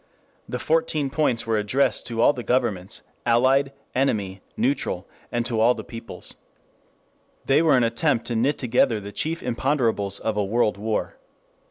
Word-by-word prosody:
The 125 - -2
Fourteen 155 0 0
Points 130 -8 +1
were 110 -1 +1
addressed 115 +7 +1
to 115 -1 -2
all 145 - +6
the 125 - -5
governments, 115 -6 -1 0.2
allied, 130 +4 +3 0.2
enemy, 100 -8 0 0.2
neutral, 125 -8 -1 0.2
and 120 -1 -1
to 120 -2 -1
all 120 +3 +5
the - - -7
peoples. 115 0 -9 1.1
They 140 +3 +4
were 155 -5 +4
an 125 - +3
attempt 115 +1 +1
to 120 - -3
knit 130 +6 +1
together 125 -2 +2
the 100 0 -8
chief 160 +10 -2
imponderables 115 -6 0
of 110 0 -2
a 105 - +2
world 105 0 +1
war. 110 +1 -2
120 Hz, 160 wpm, -24 LUFS, 110-135 Hz, 1.1 s, all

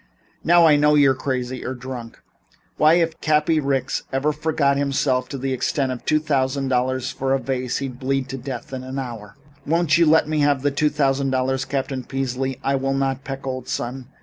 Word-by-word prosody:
"Now 175 0 +6
I 150 -2 +6
know 150 +1 +4
you're 140 -2 +5
crazy 130 -1 -3
or 130 - -4
drunk. 125 -2 -8 0.6
Why 155 +1 +5
if 165 -2 0
Cappy 155 +1 +2
Ricks 135 -2 -1
ever 140 +3 +1
forgot 150 -2 +1
himself 135 -2 0
to 140 - -5
the 135 0 -2
extent 130 +1 -1
of 125 - -7
paying 155 0 +2
two 150 - 0
hundred 135 0 0
dollars 130 0 0
for 135 0 -1
a - - -1
vase 130 -1 -2
he'd 130 -3 -5
bleed 135 0 -1
to 135 - -4
death 125 0 -7
in 130 -1 -5
an 130 +1 -6
hour." 115 -6 -6 0.3
"Won't 165 +1 +2
you 170 - +5
let 160 0 +4
me 155 0 0
have 145 -2 +2
two 150 +1 +2
thousand 140 -2 +1
dollars, 130 0 0
Captain 135 -1 -3
Peasley?" 135 0 -3
"I 135 0 +1
will 135 +1 -1
not, 135 0 -1
Peck, 135 -1 -6
old 130 -1 -4
son. 125 +1 -4
135 Hz, 200 wpm, -22 LUFS, 130-145 Hz, 0.6 s, Now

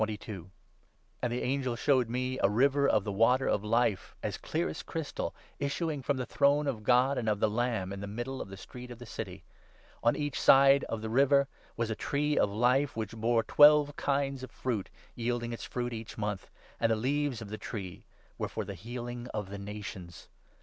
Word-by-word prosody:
And 120 - 0
the 120 - -2
angel 130 -1 0
i - - -4
showed 130 -1 +2
me 130 +2 -2
' - - -3
a 100 - +6
river 140 +6 +3
of - - +3
the 105 - -3
Water 120 +6 +3
of 100 - +1
Life,' 110 -3 +1
as - - -3
clear 165 +2 -1
as - - -5
crystal, 160 -3 -4 0.2
issuing 145 +1 -1
from 140 +1 0
the 125 - -2
throne 145 +3 +3
of 130 -6 -2
God 125 +4 +3
and 110 - -1
of 105 -1 0
the 110 - +3
Lamb, 110 -4 -1
in 100 - -6
the 100 - -5
middle 120 +6 -4
2 - - -5
of - - -7
the 95 - -9
street 125 +5 -10
of 120 - -8
the 120 - -10
City. - - -7 0.6
On 115 - +4
each 145 -1 -2
side 135 +1 +7
of 110 -1 -4
the 110 - -3
river 140 +2 +4 0.3
was 115 -1 -1
a - - -1
Tree 145 +4 0
of - - +3
Life 125 +7 +2
which 110 -1 -4
bore 115 +1 +2
twelve 150 -1 +6
kinds 140 -1 0
of 130 - -7
fruit, 115 -5 -3 0.2
yielding 120 0 -2
its 115 - -6
fruit 120 -1 -3
each 110 -1 -7
month; 105 -3 -3 0.3
and 115 -1 +2
the - - +4
leaves 135 +2 0
of 110 -3 -8
the 110 - -6
tree 95 -6 -6 0.4
were - - -2
for - - -4
the 100 - -5
healing 120 +4 -6
of 105 -2 -4
the 100 - -5
nations. 100 -4 -8
120 Hz, 210 wpm, -30 LUFS, 110-135 Hz, 0.6 s, side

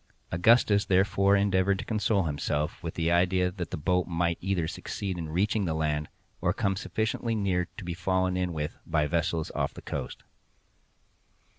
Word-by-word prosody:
Augustus 105 +2 +4
therefore 100 +1 +3
endeavored 100 -1 +2
to - - -6
console 105 -2 +1
himself 75 0 -2
with 85 - -5
the 85 0 +1
idea 90 +1 +3
that 90 -3 -5
the - - -4
boat 90 +4 +1
might 85 -1 0
either 90 -4 0
succeed 95 +3 -4
in 80 -2 -5
reaching 100 +5 +1
the 80 -2 -1
land, 75 -1 -1 0.3
or 90 - +2
come 100 -2 0
sufficiently 110 +3 -2
near 95 -4 0
to 105 - -7
be 85 - -3
fallen 95 +1 0
in 90 -1 -1
with 75 -2 -4
by 75 -1 +1
vessels 80 +1 -1
off - - -2
the - - -9
coast. - - -5
90 Hz, 170 wpm, -28 LUFS, 85-100 Hz, 0.3 s, Augustus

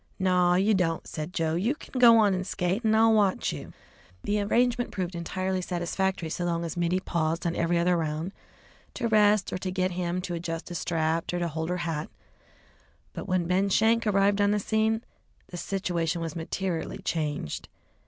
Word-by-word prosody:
"Naw, 180 -2 +3
you 200 +4 +3
don't," 170 -4 0
said 155 +2 -5
Joe; 160 -3 0
"you 210 - 0
kin 260 - -7
go 235 -2 +8
on 210 -3 +4
an' 185 0 -1
skate, 185 +3 -1
and 220 -1 +3
I'll 225 0 +5
watch 205 -3 +2
you." - - -8 0.5
The 205 0 0
arrangement 245 +3 +1
proved 185 -2 -3
entirely 185 +2 -2
satisfactory 180 -1 -2
so 175 - -2
long 170 -1 -1
as 165 - -5
Mittie 175 +1 +1
paused 165 -3 -1
on 170 - 0
every 170 +1 +1
other 175 +1 +3
round 160 +2 -2 0.6
to 240 - -1
rest 210 -2 +3
or - - -2
to 185 - -3
get 185 0 0
him 175 0 -2
to 180 -1 -5
adjust 165 0 -4
a - - -4
strap, 165 -1 -1
or 175 - -2
to 175 -1 -1
hold 160 +1 -3
her 180 - -1
hat, 160 -2 -3 1.0
but - - -6
when 185 -2 +1
Ben 185 +3 +1
Schenk 225 +3 +3
arrived 200 0 +3
on 200 - +4
the 210 - +2
scene, 220 +2 0 0.5
the 175 - -7
situation 175 -3 -1
was 165 -1 -4
materially 170 +2 -3
changed. 150 - -3
180 Hz, 190 wpm, -27 LUFS, 170-200 Hz, 1.0 s, go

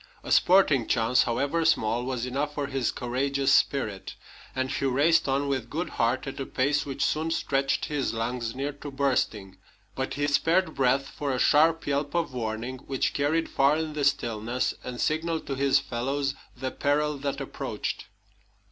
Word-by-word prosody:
A - - -6
sporting 155 - +4
chance, 120 +1 +3
however 140 +8 0
small, 120 -7 +2
was 125 -2 -2
enough 140 +4 -2
for 145 - -1
his 135 -2 -1
courageous 135 +3 0
spirit, 110 -8 +1 0.4
and 130 +1 -1
he 140 - -1
raced 145 +6 +3
on 140 +1 +1
with 130 -4 -2
good 170 +4 -3
heart 120 +4 0
at 135 +1 -6
a 135 - -2
pace 145 +3 0
which 140 0 -1
soon 155 +1 0
stretched 135 -4 0
his 145 -3 -1
lungs 115 +1 -3
near 140 +2 -2
to 145 +1 -9
bursting. 125 -8 -1 0.4
But 130 0 -3
he 145 - 0
spared 160 +4 +2
breath 135 +1 +2
for 145 0 -4
a 130 - 0
sharp 160 +5 +4
yelp 145 +2 -1
of 165 -5 0
warning, 120 +2 -4
which 135 0 -2
carried 155 +3 +1
far 140 +2 +3
in 160 -1 -3
the 150 -1 -2
stillness 120 -3 0
and 125 -1 -6
signaled 160 +1 -1
to 140 - -3
his 135 0 +3
fellows 135 +2 -2 0.2
the 130 +1 -3
peril 150 0 0
that 140 0 -3
approached. - - -4
140 Hz, 175 wpm, -27 LUFS, 125-145 Hz, 0.4 s, sporting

